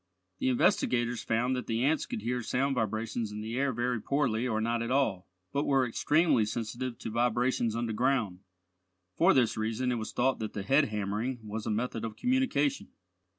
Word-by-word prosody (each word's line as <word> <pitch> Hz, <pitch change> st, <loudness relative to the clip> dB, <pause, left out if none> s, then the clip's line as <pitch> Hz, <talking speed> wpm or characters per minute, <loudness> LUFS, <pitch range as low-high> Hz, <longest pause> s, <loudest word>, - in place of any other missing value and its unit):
The -, -, +1 dB
investigators 120 Hz, -1 st, +2 dB
found 120 Hz, +3 st, 0 dB
that 125 Hz, -3 st, -4 dB
the 115 Hz, +2 st, 0 dB
ants 150 Hz, +2 st, +1 dB
could 105 Hz, -, -5 dB
hear 125 Hz, +1 st, -1 dB
sound 135 Hz, +4 st, 0 dB
vibrations 110 Hz, -1 st, -2 dB
in 105 Hz, 0 st, -5 dB
the 110 Hz, +2 st, -4 dB
air 140 Hz, +1 st, +1 dB
very 120 Hz, -1 st, -1 dB
poorly 125 Hz, -4 st, 0 dB
or 110 Hz, -3 st, 0 dB
not 115 Hz, +1 st, 0 dB
at 115 Hz, -, -3 dB
all, 115 Hz, -9 st, +1 dB, 0.3 s
but 140 Hz, -, +1 dB
were 135 Hz, -2 st, +3 dB
extremely 150 Hz, +1 st, +3 dB
sensitive 120 Hz, +3 st, -4 dB
to 110 Hz, -, -6 dB
vibrations 120 Hz, 0 st, +1 dB
underground. 115 Hz, -3 st, 0 dB, 0.8 s
For 180 Hz, +4 st, +4 dB
this 125 Hz, -4 st, +2 dB
reason 115 Hz, +4 st, -1 dB
it 120 Hz, -, -1 dB
was 110 Hz, -, -5 dB
thought 130 Hz, +2 st, +1 dB
that 110 Hz, -1 st, -4 dB
the 100 Hz, -, -4 dB
head 135 Hz, +8 st, +4 dB
hammering 105 Hz, +3 st, -3 dB
was 105 Hz, +1 st, -5 dB
a -, -, 0 dB
method 115 Hz, +1 st, -2 dB
of 110 Hz, -2 st, -4 dB
communication. 150 Hz, -, +1 dB
120 Hz, 185 wpm, -30 LUFS, 110-130 Hz, 0.8 s, For